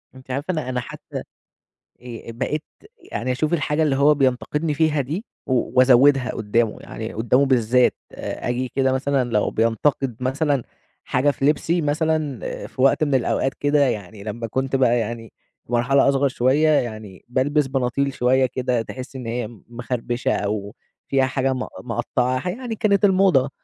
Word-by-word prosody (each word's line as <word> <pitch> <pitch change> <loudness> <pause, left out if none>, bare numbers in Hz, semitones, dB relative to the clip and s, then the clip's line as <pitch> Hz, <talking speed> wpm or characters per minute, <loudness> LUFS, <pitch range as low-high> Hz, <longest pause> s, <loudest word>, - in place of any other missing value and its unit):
أنتِ 130 0 -11
عارفة 140 +7 -2
أنا 155 -7 -3
أنا 125 -1 -1
حتّى 120 - -7 0.8
آآ 120 -2 -8
بقيت 140 +6 -3 0.5
يعني 130 +2 -2
أشوف 150 +6 -1
الحاجة 150 -1 +1
اللي 145 -3 +2
هو 140 +2 +5
بينتقدني 145 +3 0
فيها 155 -1 +2
دي، 160 - -4 0.2
و 130 - +1 0.3
وأزوّدها 130 0 +5
قُدّامُه 110 +1 0
يعني 110 0 -7
قُدّامُه 125 +5 +2
بالذات، 125 -1 +3 0.2
آجي 125 0 -3
كده 135 -1 +2
مثلًا 130 -1 0
لو 105 -2 +2
بينتقد 115 +3 0
مثلًا 135 +1 0 0.4
حاجة 140 +3 +2
في 135 - -3
لبسي، 160 +4 +2
مثلًا 155 -3 0 0.3
في 130 - -6
وقت 135 +3 +4
من 145 -3 +1
الأوقات 130 +1 +1
كده، 145 +1 +1
يعني 100 -4 -4
لمّا 115 +2 -5
كنت 135 +4 -1
بقى 120 -2 +3
يعني 115 0 -5 0.3
في - - -14
مرحلة 135 +3 +3
أصغر 140 0 +2
شوية، 130 +4 +2
يعني 110 -9 -2
بالبس 135 +4 +1
بناطيل 135 +1 -1
شوية 130 +1 +3
كده 125 -1 -1
تحِسِّي 130 +3 -8
إن 125 - -7
هي 115 -1 -2 0.2
مخربشة، 120 +2 -2
أو 105 +1 -3 0.3
فيها 135 -1 +2
حاجة 130 0 0
م 130 0 -4 0.2
مقطّعة، 125 +4 -1
يعني 235 +3 -4
كانت 200 -2 +2
الموضة، 185 -9 +4
130 Hz, 155 wpm, -22 LUFS, 120-145 Hz, 0.8 s, هو